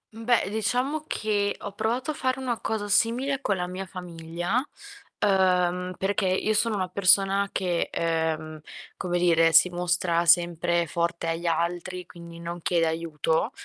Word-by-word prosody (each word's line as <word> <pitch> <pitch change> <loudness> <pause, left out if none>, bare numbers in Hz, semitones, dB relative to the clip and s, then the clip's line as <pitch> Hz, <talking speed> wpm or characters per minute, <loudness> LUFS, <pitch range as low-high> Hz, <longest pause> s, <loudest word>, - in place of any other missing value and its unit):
Mhmm, 225 0 -9
beh, 235 -5 +2
diciamo 255 +7 -1
che 205 -2 -1
ho 200 - -5
provato 240 +8 -2
a - - -4
fare 260 -1 -1
una 245 -3 -2
cosa 215 -2 -3
simile 250 +6 +1
con 200 - 0
la 180 -1 -2
mia 185 +1 -5
famiglia, 175 +5 -3 0.6
uhm, 180 -2 +2
perché 195 0 0
io 190 +4 +1
sono 215 +1 +1
una 185 -2 -1
persona 195 +1 +3
che, 180 -3 -1
ehm, 160 -1 -2 0.4
come 175 -1 -2
dire, 165 -2 +4
si 180 - +7
mostra 175 -1 0
sempre 170 0 +3
forte 170 +1 -2
agli 165 +1 -2
altri, 175 +2 -2
quindi 170 -1 -12
non 170 0 -6
chiede 170 -1 +1
aiuto, 160 - -1
180 Hz, 155 wpm, -26 LUFS, 170-205 Hz, 0.6 s, si